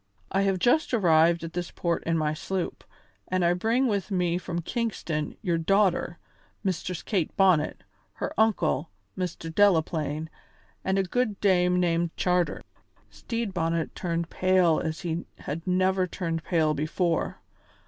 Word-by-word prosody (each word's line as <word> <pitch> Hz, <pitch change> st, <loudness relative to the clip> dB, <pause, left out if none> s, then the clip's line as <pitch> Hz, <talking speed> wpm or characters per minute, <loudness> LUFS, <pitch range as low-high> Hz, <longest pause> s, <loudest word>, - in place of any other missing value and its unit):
I 195 Hz, -, +2 dB
have 195 Hz, -1 st, +2 dB
just 245 Hz, -, +2 dB
arrived 170 Hz, -4 st, +4 dB
at 165 Hz, 0 st, -6 dB
this 175 Hz, -1 st, -3 dB
port 170 Hz, -1 st, -1 dB
in 165 Hz, 0 st, +1 dB
my 155 Hz, -1 st, 0 dB
sloop, 185 Hz, +3 st, -4 dB, 0.4 s
and 185 Hz, -1 st, +1 dB
I 170 Hz, -, +4 dB
bring 225 Hz, +8 st, +1 dB
with 205 Hz, -6 st, -1 dB
me 180 Hz, -3 st, +1 dB
from 175 Hz, -2 st, -4 dB
Kingston 170 Hz, -, -3 dB
your 170 Hz, -4 st, +1 dB
daughter, 185 Hz, -1 st, +2 dB, 0.5 s
Mistress 180 Hz, -2 st, -2 dB
Kate 185 Hz, -8 st, -1 dB
Bonnet, 185 Hz, -6 st, +3 dB, 0.3 s
her -, -, -4 dB
uncle, 185 Hz, -8 st, +1 dB, 0.3 s
Mr. 175 Hz, -3 st, -4 dB
Delaplaine, 160 Hz, -5 st, +2 dB, 0.6 s
and 190 Hz, +1 st, +1 dB
a 195 Hz, -, +3 dB
good 215 Hz, +2 st, -1 dB
dame 180 Hz, -2 st, +3 dB
named 170 Hz, -1 st, +1 dB
Charter." 180 Hz, -1 st, +1 dB, 0.5 s
Stede 230 Hz, -4 st, -4 dB
Bonnet 165 Hz, -2 st, -1 dB
turned 170 Hz, -2 st, -3 dB
pale 185 Hz, -3 st, +3 dB
as 160 Hz, +3 st, -3 dB
he 170 Hz, -1 st, -3 dB
had 160 Hz, +5 st, -6 dB
never 185 Hz, 0 st, +2 dB
turned 165 Hz, -3 st, -3 dB
pale 160 Hz, -3 st, +2 dB
before. 160 Hz, +3 st, -1 dB
175 Hz, 145 wpm, -27 LUFS, 165-190 Hz, 0.6 s, arrived